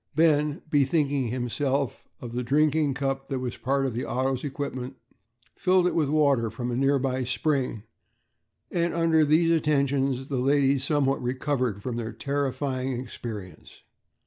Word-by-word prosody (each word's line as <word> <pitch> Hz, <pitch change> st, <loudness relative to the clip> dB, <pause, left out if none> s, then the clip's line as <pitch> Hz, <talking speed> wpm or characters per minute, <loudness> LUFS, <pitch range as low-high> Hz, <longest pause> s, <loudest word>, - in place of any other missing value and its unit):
Ben, 150 Hz, -2 st, +2 dB
bethinking 140 Hz, -2 st, +1 dB
himself 130 Hz, +3 st, -2 dB
of 120 Hz, -2 st, -8 dB
the 125 Hz, -, -1 dB
drinking 145 Hz, +2 st, +2 dB
cup 135 Hz, 0 st, -2 dB
that 135 Hz, -, -1 dB
was 125 Hz, -2 st, -4 dB
part 135 Hz, +1 st, 0 dB
of 130 Hz, -, -2 dB
the 120 Hz, -, -3 dB
auto's 130 Hz, 0 st, -1 dB
equipment, 135 Hz, -2 st, -4 dB, 0.6 s
filled 185 Hz, -1 st, +3 dB
it 180 Hz, -, +1 dB
with 155 Hz, -4 st, +1 dB
water 140 Hz, -6 st, +3 dB
from 120 Hz, +2 st, -4 dB
a -, -, -1 dB
nearby 135 Hz, -1 st, +1 dB
spring, 125 Hz, -1 st, -1 dB, 0.9 s
and 170 Hz, -1 st, 0 dB
under 165 Hz, -2 st, +3 dB
these 160 Hz, +3 st, +3 dB
attentions 140 Hz, -4 st, +1 dB
the 140 Hz, -, -2 dB
ladies 135 Hz, 0 st, +3 dB
somewhat 140 Hz, -3 st, +1 dB
recovered 125 Hz, -4 st, -1 dB
from 125 Hz, -2 st, -3 dB
their 115 Hz, -2 st, -4 dB
terrifying 135 Hz, 0 st, -2 dB
experience. 105 Hz, -8 st, -8 dB
135 Hz, 145 wpm, -26 LUFS, 125-145 Hz, 0.9 s, filled